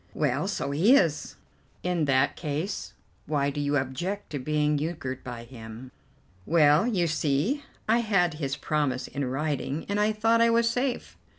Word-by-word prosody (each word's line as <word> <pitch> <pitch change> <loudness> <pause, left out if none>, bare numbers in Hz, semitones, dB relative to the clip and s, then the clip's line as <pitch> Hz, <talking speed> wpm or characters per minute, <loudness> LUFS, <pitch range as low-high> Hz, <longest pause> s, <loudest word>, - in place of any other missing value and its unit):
"Well, 145 +3 0
so 200 -8 -2
he 190 - +5
is." 165 - +1 0.5
"In 180 -3 0
that 135 0 +2
case, 155 +5 -4 0.3
why 145 -2 +1
do 145 - -3
you 145 0 +1
object 160 +10 -3
to 145 - -3
being 150 +2 +1
euchred 145 -5 -4
by 120 -2 -7
him?" 120 +1 -10 0.5
"Well, 155 - +4
you 190 -8 +1
see, 160 - 0 0.2
I 225 +2 +4
had 195 -7 +2
his 140 0 -2
promise 145 -4 -1
in 140 - -4
writing, 145 +2 -2
and 200 +1 -1
I 210 +1 +3
thought 225 +2 +2
I 230 - +5
was 230 0 +3
safe." 245 +2 -2
150 Hz, 165 wpm, -27 LUFS, 140-200 Hz, 0.5 s, he